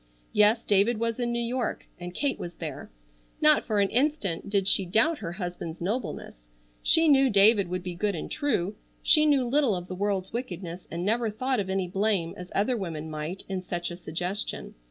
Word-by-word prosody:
Yes, 210 Hz, +3 st, +4 dB
David 210 Hz, +3 st, +2 dB
was 230 Hz, +1 st, -1 dB
in 240 Hz, -1 st, -1 dB
New 235 Hz, -, -1 dB
York, 245 Hz, +1 st, -2 dB
and 175 Hz, 0 st, -6 dB
Kate 285 Hz, -2 st, -1 dB
was 175 Hz, -1 st, -7 dB
there. 155 Hz, -5 st, -6 dB, 0.5 s
Not 305 Hz, 0 st, +6 dB
for 215 Hz, -3 st, +1 dB
an 200 Hz, -1 st, +3 dB
instant 245 Hz, -, 0 dB
did 200 Hz, -2 st, +1 dB
she 195 Hz, -, +5 dB
doubt 225 Hz, -, +2 dB
her 170 Hz, -5 st, -5 dB
husband's 175 Hz, -3 st, -5 dB
nobleness. 175 Hz, -, -4 dB, 0.3 s
She 325 Hz, 0 st, +4 dB
knew 275 Hz, -2 st, +5 dB
David 200 Hz, -1 st, +5 dB
would 180 Hz, 0 st, -4 dB
be 180 Hz, -1 st, -4 dB
good 200 Hz, +3 st, -1 dB
and 160 Hz, -, -6 dB
true. 210 Hz, -, 0 dB, 0.3 s
She 305 Hz, -1 st, +6 dB
knew 280 Hz, -4 st, +3 dB
little 260 Hz, -3 st, +2 dB
of 180 Hz, 0 st, -5 dB
the 185 Hz, -, -6 dB
world's 195 Hz, 0 st, -2 dB
wickedness, 185 Hz, -7 st, -5 dB
and 170 Hz, +2 st, -4 dB
never 225 Hz, +2 st, +1 dB
thought 255 Hz, +4 st, -1 dB
of 190 Hz, -2 st, -3 dB
any 190 Hz, -1 st, -1 dB
blame, 190 Hz, -2 st, 0 dB
as 180 Hz, 0 st, -10 dB
other 215 Hz, +6 st, +1 dB
women 160 Hz, -7 st, -5 dB
might, 155 Hz, +5 st, -5 dB
in 190 Hz, -1 st, -3 dB
such 175 Hz, -1 st, -4 dB
a -, -, -5 dB
suggestion. 180 Hz, +4 st, -4 dB
200 Hz, 195 wpm, -27 LUFS, 175-235 Hz, 0.5 s, Not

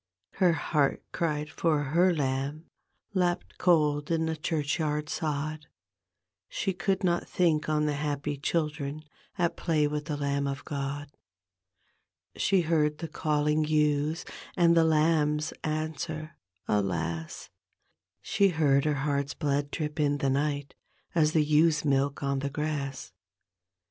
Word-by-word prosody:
Her 180 Hz, -3 st, +4 dB
heart 145 Hz, -1 st, 0 dB
cried 150 Hz, -3 st, -2 dB
for 155 Hz, -3 st, +1 dB
her 170 Hz, +6 st, +3 dB
lamb 140 Hz, +1 st, -2 dB, 0.5 s
Lapped 180 Hz, -2 st, -1 dB
cold 150 Hz, -4 st, +3 dB
in 165 Hz, -1 st, +1 dB
the 160 Hz, 0 st, -1 dB
churchyard 150 Hz, -1 st, -1 dB
sod, 155 Hz, -1 st, -3 dB, 0.8 s
She 195 Hz, -, -1 dB
could 190 Hz, +2 st, -1 dB
not 175 Hz, -1 st, +1 dB
think 160 Hz, -4 st, +1 dB
on 150 Hz, -1 st, +2 dB
the 150 Hz, -, +1 dB
happy 145 Hz, 0 st, -2 dB
children 150 Hz, -1 st, -2 dB, 0.3 s
At 170 Hz, -2 st, +1 dB
play 155 Hz, -3 st, +1 dB
with 150 Hz, 0 st, -2 dB
ttiK 150 Hz, -2 st, -3 dB
Lamb 140 Hz, 0 st, 0 dB
of 140 Hz, 0 st, -4 dB
God. 140 Hz, 0 st, -4 dB, 1.2 s
She 195 Hz, -2 st, +2 dB
heard 155 Hz, -2 st, +1 dB
the 165 Hz, -, -5 dB
calling 150 Hz, 0 st, +1 dB
ewes 150 Hz, +1 st, +1 dB, 0.3 s
And 170 Hz, -1 st, +5 dB
the 165 Hz, -, +6 dB
lambs 155 Hz, -1 st, +2 dB
answer 155 Hz, 0 st, -3 dB, 0.3 s
alas 85 Hz, -5 st, -2 dB
I -, -, -52 dB, 0.7 s
She 200 Hz, -, +3 dB
heard 145 Hz, -5 st, +2 dB
her 150 Hz, -1 st, +2 dB
heart's 140 Hz, -1 st, -1 dB
blood 145 Hz, -2 st, 0 dB
drip 150 Hz, +1 st, -4 dB
in 145 Hz, -1 st, +2 dB
die 140 Hz, -1 st, 0 dB
ni^t. 145 Hz, +1 st, -1 dB, 0.4 s
As 155 Hz, -2 st, +3 dB
the 155 Hz, -, +4 dB
ewes' 155 Hz, +1 st, +3 dB
milk 140 Hz, 0 st, +1 dB
on 140 Hz, 0 st, 0 dB
the 140 Hz, +1 st, -2 dB
grass. 140 Hz, -6 st, -4 dB
150 Hz, 135 wpm, -28 LUFS, 145-160 Hz, 1.2 s, the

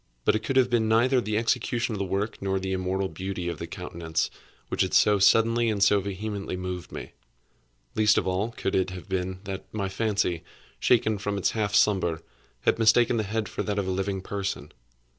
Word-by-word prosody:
But -, -, +4 dB
it -, -, +1 dB
could 135 Hz, -, -3 dB
have 130 Hz, -1 st, +5 dB
been 115 Hz, -2 st, +2 dB
neither 125 Hz, +3 st, +4 dB
the 105 Hz, -2 st, -1 dB
execution 115 Hz, +1 st, 0 dB
of 105 Hz, -, -4 dB
the 100 Hz, -, -1 dB
work, 100 Hz, +3 st, -2 dB
nor 95 Hz, 0 st, 0 dB
the 95 Hz, 0 st, -3 dB
immortal 95 Hz, +1 st, -1 dB
beauty 95 Hz, -2 st, -5 dB
of 85 Hz, -, -5 dB
the 85 Hz, -, -5 dB
countenance, 85 Hz, -2 st, -3 dB, 0.4 s
which -, -, -1 dB
had -, -, +1 dB
so 105 Hz, -1 st, +5 dB
suddenly 115 Hz, +3 st, +4 dB
and 100 Hz, -3 st, +1 dB
so 100 Hz, 0 st, +5 dB
vehemently 100 Hz, 0 st, -4 dB
moved 90 Hz, -1 st, -5 dB
me. -, -, -7 dB, 0.8 s
Least 105 Hz, 0 st, +4 dB
of -, -, +1 dB
all, 95 Hz, +4 st, 0 dB
could 115 Hz, -4 st, -3 dB
it 95 Hz, 0 st, +1 dB
have 90 Hz, +1 st, -8 dB
been 95 Hz, -1 st, -3 dB
that 95 Hz, -1 st, -7 dB
my 100 Hz, -3 st, -2 dB
fancy, 100 Hz, -4 st, 0 dB, 0.4 s
shaken 110 Hz, -4 st, +3 dB
from 105 Hz, 0 st, -2 dB
its 100 Hz, -, +1 dB
half 105 Hz, -2 st, -1 dB
slumber, 90 Hz, -6 st, +2 dB, 0.4 s
had -, -, +2 dB
mistaken 115 Hz, +1 st, +4 dB
the -, -, +2 dB
head 110 Hz, +1 st, -2 dB
for -, -, -4 dB
that 105 Hz, -1 st, -2 dB
of 100 Hz, -2 st, -1 dB
a -, -, 0 dB
living 95 Hz, +1 st, -2 dB
person. 95 Hz, -8 st, -4 dB
100 Hz, 205 wpm, -26 LUFS, 95-110 Hz, 0.8 s, have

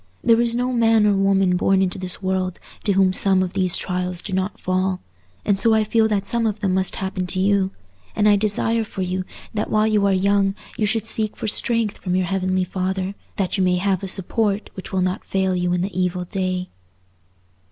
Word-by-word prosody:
There 230 Hz, 0 st, +4 dB
is 235 Hz, -1 st, +1 dB
no 250 Hz, +1 st, -1 dB
man 225 Hz, -2 st, +3 dB
or 205 Hz, -, +4 dB
woman 195 Hz, -2 st, +2 dB
born 190 Hz, +1 st, +2 dB
into 185 Hz, 0 st, -2 dB
this 185 Hz, +1 st, -2 dB
world 185 Hz, -1 st, -1 dB, 0.3 s
to 200 Hz, -, +2 dB
whom 190 Hz, -1 st, +3 dB
some 190 Hz, -1 st, +3 dB
of 180 Hz, -, -4 dB
these 185 Hz, -2 st, +2 dB
trials 180 Hz, -1 st, -3 dB
do 195 Hz, -, -5 dB
not 190 Hz, +2 st, -2 dB
fall, 185 Hz, 0 st, -1 dB, 0.5 s
and 195 Hz, -1 st, +1 dB
so 225 Hz, 0 st, +3 dB
I 220 Hz, -, +3 dB
feel 220 Hz, +1 st, +2 dB
that 205 Hz, -2 st, -1 dB
some 235 Hz, +1 st, 0 dB
of 210 Hz, 0 st, -3 dB
them 195 Hz, -3 st, 0 dB
must 190 Hz, 0 st, +4 dB
happen 190 Hz, -1 st, -3 dB
to 185 Hz, -, -2 dB
you; 195 Hz, 0 st, +2 dB, 0.5 s
and 210 Hz, -, +2 dB
I 205 Hz, -, +6 dB
desire 215 Hz, +2 st, +1 dB
for 195 Hz, -3 st, -5 dB
you, 185 Hz, 0 st, -3 dB, 0.3 s
that 210 Hz, -1 st, -2 dB
while 215 Hz, 0 st, +2 dB
you 210 Hz, -2 st, +2 dB
are -, -, +2 dB
young 195 Hz, +1 st, +2 dB, 0.2 s
you 215 Hz, -4 st, 0 dB
should 225 Hz, +1 st, 0 dB
seek 220 Hz, -1 st, -2 dB
for -, -, -4 dB
strength 225 Hz, 0 st, +1 dB
from 180 Hz, -1 st, -2 dB
your 185 Hz, 0 st, +1 dB
Heavenly 185 Hz, 0 st, 0 dB
Father, 185 Hz, +1 st, -3 dB, 0.2 s
that 195 Hz, 0 st, -1 dB
you -, -, +3 dB
may 180 Hz, -1 st, +2 dB
have 190 Hz, 0 st, 0 dB
a 195 Hz, -, -4 dB
support 200 Hz, +2 st, -1 dB
which 190 Hz, -, -9 dB
will 185 Hz, -1 st, 0 dB
not 185 Hz, +1 st, -2 dB
fail 190 Hz, -1 st, 0 dB
you 180 Hz, 0 st, 0 dB
in 180 Hz, 0 st, 0 dB
the 190 Hz, -1 st, -4 dB
evil 180 Hz, 0 st, -1 dB
day." 185 Hz, 0 st, -2 dB
190 Hz, 220 wpm, -21 LUFS, 185-210 Hz, 0.5 s, I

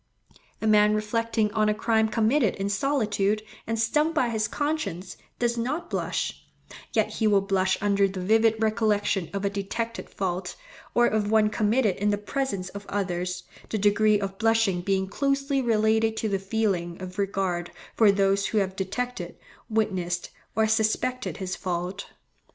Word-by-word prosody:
A -, -, 0 dB
man 210 Hz, 0 st, +5 dB
reflecting 220 Hz, 0 st, 0 dB
on 215 Hz, -1 st, +2 dB
a 210 Hz, -, +1 dB
crime 220 Hz, 0 st, +2 dB
committed 225 Hz, +1 st, +2 dB
in 195 Hz, 0 st, -2 dB
solitude, 215 Hz, -3 st, 0 dB, 0.2 s
and 225 Hz, 0 st, -1 dB
stung 300 Hz, +8 st, +2 dB
by 255 Hz, -7 st, +2 dB
his 220 Hz, -2 st, 0 dB
conscience, 290 Hz, -, -3 dB, 0.2 s
does 235 Hz, -1 st, 0 dB
not 275 Hz, +9 st, -3 dB
blush; -, -, -2 dB, 0.5 s
yet -, -, +1 dB
he 220 Hz, -, 0 dB
will 200 Hz, -2 st, +4 dB
blush 190 Hz, -1 st, +1 dB
under 200 Hz, -1 st, +3 dB
the 190 Hz, -1 st, -6 dB
vivid 220 Hz, +4 st, +3 dB
recollection 215 Hz, -5 st, +1 dB
of 200 Hz, +1 st, -3 dB
a -, -, +2 dB
detected 225 Hz, +4 st, -4 dB
fault, 180 Hz, -1 st, -3 dB, 0.4 s
or 240 Hz, -, +5 dB
of 215 Hz, -2 st, +1 dB
one 215 Hz, -1 st, +3 dB
committed 215 Hz, -1 st, +2 dB
in 205 Hz, +1 st, +1 dB
the 205 Hz, -, +1 dB
presence 205 Hz, -3 st, -3 dB
of 200 Hz, 0 st, -9 dB
others, 180 Hz, -2 st, -2 dB, 0.3 s
the 220 Hz, -, -1 dB
degree 210 Hz, +1 st, +3 dB
of 195 Hz, -1 st, -5 dB
blushing 225 Hz, -5 st, +2 dB
being 190 Hz, +1 st, 0 dB
closely 275 Hz, +4 st, 0 dB
related 220 Hz, -1 st, +2 dB
to 220 Hz, -, -1 dB
the 195 Hz, -2 st, 0 dB
feeling 195 Hz, -4 st, -1 dB
of 185 Hz, +1 st, -7 dB
regard 190 Hz, -3 st, -1 dB, 0.2 s
for 215 Hz, -3 st, +6 dB
those 195 Hz, 0 st, +2 dB
who 220 Hz, -, -1 dB
have 190 Hz, -2 st, 0 dB
detected, 195 Hz, -1 st, -4 dB, 0.3 s
witnessed, 185 Hz, -6 st, -1 dB, 0.2 s
or 220 Hz, -, +3 dB
suspected 220 Hz, +3 st, 0 dB
his 190 Hz, -2 st, -3 dB
fault. 180 Hz, +2 st, -4 dB
210 Hz, 160 wpm, -26 LUFS, 195-225 Hz, 0.5 s, for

